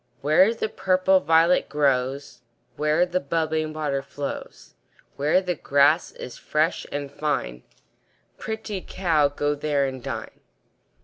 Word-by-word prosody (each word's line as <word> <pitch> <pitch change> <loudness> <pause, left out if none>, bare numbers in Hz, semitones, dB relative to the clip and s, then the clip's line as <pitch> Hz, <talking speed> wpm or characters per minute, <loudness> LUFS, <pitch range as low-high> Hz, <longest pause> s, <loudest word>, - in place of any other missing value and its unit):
Where 155 +9 +5
the 220 - -2
purple 190 -2 +2
violet 165 +2 +3
grows, 140 -1 0 0.3
Where 150 +3 +2
the 180 0 -1
bubbling 155 +1 -1
water 150 -3 -2
flows, 140 +1 -7 0.4
Where 150 +6 +2
the 180 -1 -1
grass 145 +1 +2
is 125 - -9
fresh 155 +3 0
and 145 -1 -4
fine, 140 - -2 0.8
Pretty 220 -3 -5
cow, 165 -7 +1
go 145 +1 -1
there 145 -1 0
and 130 -1 -5
dine. - - -6
150 Hz, 125 wpm, -24 LUFS, 140-175 Hz, 0.8 s, Where